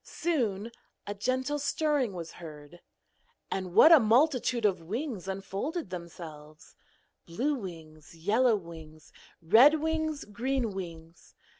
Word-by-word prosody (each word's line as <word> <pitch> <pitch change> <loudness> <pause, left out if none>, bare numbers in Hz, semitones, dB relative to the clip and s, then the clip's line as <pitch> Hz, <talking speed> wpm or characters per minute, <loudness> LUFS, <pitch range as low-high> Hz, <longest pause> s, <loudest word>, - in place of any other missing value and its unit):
Soon 235 - -2 0.3
a 205 - -4
gentle 255 +7 -1
stirring 290 -5 0
was 170 -2 -7
heard, 155 0 -12 0.7
and 185 -2 -4
what 315 - +8
a 325 - +10
multitude 245 0 +2
of 190 -4 +1
wings 215 - -5
unfolded 195 - -4
themselves: 155 -4 -10 0.5
blue 250 - -1
wings, 165 - -9
yellow 220 +8 +2
wings, 160 -4 -11 0.3
red 250 - +6
wings, 315 -1 -2
green 235 +3 -2
wings. 165 -3 -9
205 Hz, 115 wpm, -29 LUFS, 170-270 Hz, 0.7 s, a